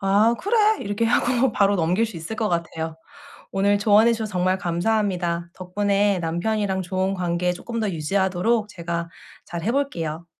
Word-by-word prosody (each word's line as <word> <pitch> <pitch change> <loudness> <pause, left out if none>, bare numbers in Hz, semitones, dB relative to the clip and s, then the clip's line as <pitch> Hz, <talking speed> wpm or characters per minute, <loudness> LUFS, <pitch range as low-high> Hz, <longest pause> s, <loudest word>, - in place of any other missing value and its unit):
'아 205 +4 +3
그래.' 430 +1 +3
이렇게 205 +3 -1
하고 240 +1 +2
바로 200 0 +3
넘길 180 +6 +2
수 220 - -9
있을 165 +7 -6
것 215 -1 0
같아요. 165 -2 -3 0.6
오늘 200 +1 +2
조언해 215 +3 +5
주셔서 220 -2 -4
정말 185 +1 +1
감사합니다. 175 -2 -1
덕분에 200 +1 +1
남편이랑 190 +4 -1
좋은 185 +2 -1
관계 180 -1 0
쪼끔 230 +6 -5
더 215 - 0
유지하도록 190 +6 0
제가 170 -2 -4 0.4
잘 170 -1 -6
해 225 - 0
볼게요. 170 - -2
195 Hz, 345 characters per minute, -23 LUFS, 175-220 Hz, 0.6 s, 조언해